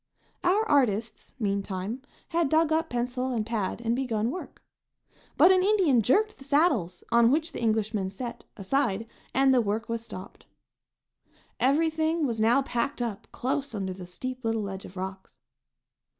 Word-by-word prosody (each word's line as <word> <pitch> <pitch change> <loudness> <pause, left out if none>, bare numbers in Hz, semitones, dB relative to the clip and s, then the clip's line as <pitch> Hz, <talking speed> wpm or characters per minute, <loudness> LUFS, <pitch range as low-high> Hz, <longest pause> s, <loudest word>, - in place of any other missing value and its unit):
Our 400 +5 +3
artists, 235 -6 +1
meantime, 200 +2 -2 0.3
had 330 -3 +1
dug 315 +1 +3
up 320 +1 0
pencil 250 +1 -2
and 225 -4 -1
pad 225 -1 -2
and 235 0 0
begun 235 -3 -1
work. 365 - -8 0.7
But 365 - +7
an 370 -1 +5
Indian 370 - +4
jerked 420 - +2
the - - -11
saddles, 275 - +1
on 235 0 +6
which 315 +5 +1
the - - -6
Englishmen 215 -3 0
sat, 235 +4 -6
aside, 225 0 0 0.3
and 270 0 +4
the 250 - +5
work 220 +1 -2
was 230 0 -2
stopped. 185 -5 -10 1.1
Everything 315 +3 +2
was 230 -4 -1
now 240 +5 +4
packed 260 +3 -2
up 230 -3 -4
close 275 0 -2
under 190 -2 -3
the 180 -1 -9
steep 255 +8 -6
little 225 -1 0
ledge 195 -1 -6
of 185 - -12
rocks. 190 -6 -7
240 Hz, 155 wpm, -27 LUFS, 210-285 Hz, 1.1 s, But